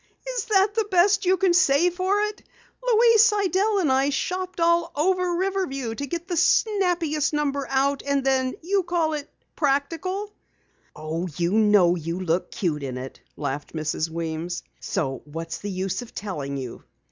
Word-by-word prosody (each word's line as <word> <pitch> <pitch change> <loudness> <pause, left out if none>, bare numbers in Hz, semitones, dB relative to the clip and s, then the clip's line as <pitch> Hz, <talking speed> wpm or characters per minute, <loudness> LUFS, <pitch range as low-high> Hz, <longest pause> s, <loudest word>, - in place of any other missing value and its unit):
"Is - - -2
that 405 -1 +3
the 440 -1 0
best 390 +1 +3
you 375 +1 +4
can 365 0 +3
say 345 0 +4
for 375 +3 0
it? 420 0 -3 0.4
Louise 460 -2 +5
Sidell 410 -1 +2
and 330 -8 +2
I 270 +2 +3
shopped 365 +5 -3
all 340 0 +2
over 360 +3 +1
Riverview 350 -10 -2
to 280 +5 -5
get 340 +5 -5
the 355 - -2
snappiest 350 -5 +2
number 280 -2 -1
out, 275 +1 +1
and 280 -1 0
then 260 -1 +1
you 390 +3 +1
call 340 -3 0
it 295 -1 -5 0.3
practical." 330 +8 -1 0.6
"Oh, 160 +3 -4
you 170 0 0
know 210 -5 +5
you 165 +1 -4
look 180 -1 -1
cute 160 -6 -2
in 130 -2 -4
it," 130 +1 -8 0.2
laughed 145 0 -4
Mrs. 155 0 -2
Weems. 165 +1 -4 0.2
"So 135 -4 -2
what's 165 +2 -6
the 205 - -5
use 190 +3 -2
of 245 - -12
telling 145 -9 -4
you?" 130 -3 -7
290 Hz, 165 wpm, -24 LUFS, -, 0.6 s, Louise